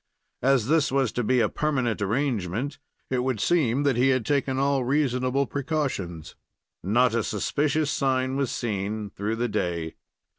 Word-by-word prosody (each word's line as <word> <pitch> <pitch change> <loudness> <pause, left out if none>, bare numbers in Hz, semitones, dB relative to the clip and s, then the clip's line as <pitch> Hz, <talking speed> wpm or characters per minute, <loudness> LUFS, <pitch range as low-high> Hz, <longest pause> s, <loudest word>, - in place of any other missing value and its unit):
As 130 -3 +3
this 150 +1 +2
was 135 -3 +1
to 120 - -2
be 125 +2 +3
a - - +3
permanent 130 -8 -1
arrangement, 115 - -1 0.3
it 130 - +1
would 125 -3 -1
seem 140 -3 +2
that 140 -4 +2
he 125 +2 +4
had 130 -4 +1
taken 140 -2 0
all 140 -1 +2
reasonable 130 0 +1
precautions. 135 - -3 0.5
Not 120 +6 +2
a 115 - +2
suspicious 145 +9 0
sign 130 -1 0
was 135 -2 0
seen 105 -1 -3
through 105 +3 -2
the 120 +2 -1
day. 85 -6 -2
130 Hz, 155 wpm, -26 LUFS, 110-140 Hz, 0.5 s, he